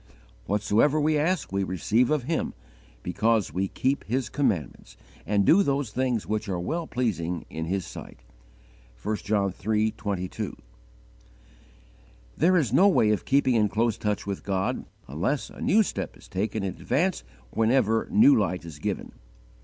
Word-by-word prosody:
"Whatsoever 105 +9 +2
we 155 +1 +2
ask 160 - 0
we 100 0 0
receive 105 +7 +1
of 150 -4 +1
Him, 160 +5 -2 0.5
because 110 -1 +1
we 95 +3 0
keep 135 +7 -1
His 125 +3 -1
commandments, 95 - -2 0.3
and 100 -1 +2
do 185 - +6
those 140 - 0
things 125 -2 -1
which 105 0 -2
are 90 -2 -1
well 160 - -3
pleasing 90 -9 -2
in 80 0 -4
His 95 +1 -2
sight." - - -10 0.8
(1 105 +1 -1
John 100 -3 0 0.2
iii. 110 0 +2
22.) 100 -4 -4 1.8
There 180 +3 +4
is 130 -9 +1
no 185 +9 +6
way 115 - +4
of 105 - -1
keeping 135 -2 +3
in 105 -3 +3
close 110 +2 +1
touch 105 -1 -1
with 100 -1 -4
God 95 -1 -1 0.2
unless 85 - -2
a - - -12
new 220 +2 +4
step - - -5
is - - -16
taken 105 +2 -2
in 95 -2 -2
advance - - 0 0.3
whenever 115 -1 +2
new 270 +6 +6
light 90 - 0
is 80 -3 -9
given. - - -3
110 Hz, 155 wpm, -26 LUFS, 95-135 Hz, 1.8 s, do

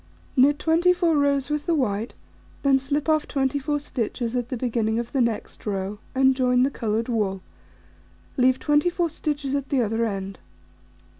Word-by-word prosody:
Knit 285 +3 +5
24 340 +1 +3
rows 280 -1 +1
with 300 +2 -2
the 340 - +2
white, 220 -5 -1 0.5
then 275 -1 +4
slip 285 +3 -2
off 310 -1 +2
24 280 +2 0
stitches 245 -3 -3
at 245 -1 -2
the 255 - -3
beginning 225 -2 0
of 235 0 -3
the 270 - +1
next 235 -3 -2
row, 200 0 -3 0.2
and 265 0 +4
join 250 -1 +3
the 270 - +1
coloured 225 -2 -2
wool, 205 -6 -1 0.9
leave 255 0 +3
24 335 +5 +1
stitches 290 -3 -3
at 280 -1 -2
the 275 - +1
other 225 0 0
end. 195 -2 -5
265 Hz, 160 wpm, -24 LUFS, 230-290 Hz, 0.9 s, Knit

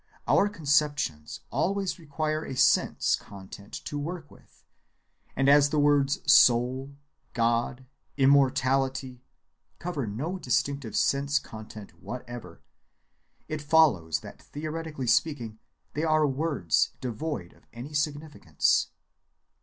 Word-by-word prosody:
Our 205 - +4
conceptions 145 - 0
always 195 0 -1
require 155 0 -3
a 135 - -6
sense‐content 100 -4 0
to 145 - -4
work 160 0 -6
with, - - -21 0.7
and 135 +1 +1
as 145 0 +6
the 155 - -1
words 145 -1 +3
"soul," 130 +3 +4 0.4
"God," 120 +2 0 0.3
"immortality," 135 -1 +2 0.6
cover 160 -9 -4
no 150 - -4
distinctive 140 - -1
sense‐content 140 -7 -2
whatever, 120 -8 -8 0.9
it 155 -1 -4
follows 135 - +3
that - - -12
theoretically 155 -2 -6
speaking 115 -4 0 0.3
they 150 - -2
are 155 -1 +3
words 140 - 0
devoid 120 - -5
of - - -26
any 125 +6 -9
significance. 150 0 0
140 Hz, 100 wpm, -27 LUFS, 120-155 Hz, 0.9 s, as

